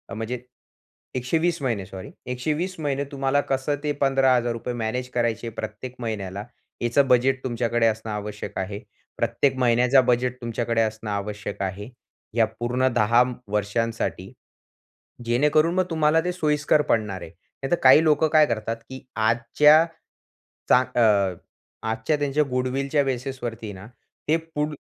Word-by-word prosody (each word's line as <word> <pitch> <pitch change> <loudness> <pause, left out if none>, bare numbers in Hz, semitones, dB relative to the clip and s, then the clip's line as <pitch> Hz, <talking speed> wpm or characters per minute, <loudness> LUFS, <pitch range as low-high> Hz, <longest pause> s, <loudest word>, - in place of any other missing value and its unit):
म्हणजे 115 +3 -4 0.8
120 160 +6 0
महिने 115 -8 -1
सॉरी, 95 0 -9
120 150 +9 -2
महिने 140 -2 -1
तुम्हाला 140 +1 +1
कसं 135 +2 0
ते 150 - 0
15 135 -1 +4
हजार 120 -1 +1
रुपये 120 +1 -4
मॅनेज 120 +2 -3
करायचे 120 -1 -1
प्रत्येक 110 +4 -6
महिन्याला, 100 -4 -4 0.4
याचं 125 +3 +2
बजेट 130 +1 +3
तुमच्याकडे 120 -2 +1
असणं 110 0 -2
आवश्यक 105 0 -5
आहे. 100 +2 -4 0.4
प्रत्येक 135 -2 +1
महिन्याचा 125 +2 +4
बजेट 125 0 0
तुमच्याकडे 115 0 -1
असणं 110 0 -2
आवश्यक 100 0 -4
आहे. 100 +4 -5 0.5
या 115 -1 +4
पूर्ण 125 +2 +1
10 120 +2 +4 0.3
वर्षांसाठी. 105 +2 -2 0.9
जेणेकरून 150 +7 +3
मग 185 - +3
तुम्हाला 160 0 +3
ते 180 - 0
सोयीस्कर 150 -3 +2
पडणार 105 -5 0
आहे. - - -8
नाहीतर 135 - -4
काही 130 +4 +8
लोकं 155 0 +3
काय 155 -1 +7
करतात, 115 -1 -2
की 130 0 -9
आजच्या, 135 +8 +4 0.8
चा 125 - +7 0.2
अ, 100 -6 +3 0.5
आजच्या 115 +7 0
त्यांच्या 145 +1 +1
गुडविलच्या 135 +3 0
बेसिस 130 -1 -4
वरती 115 -3 -5
ना, 95 +3 -11 0.4
ते 160 +2 +4
पुढ 155 -2 -4
125 Hz, 135 wpm, -24 LUFS, 110-140 Hz, 0.9 s, काही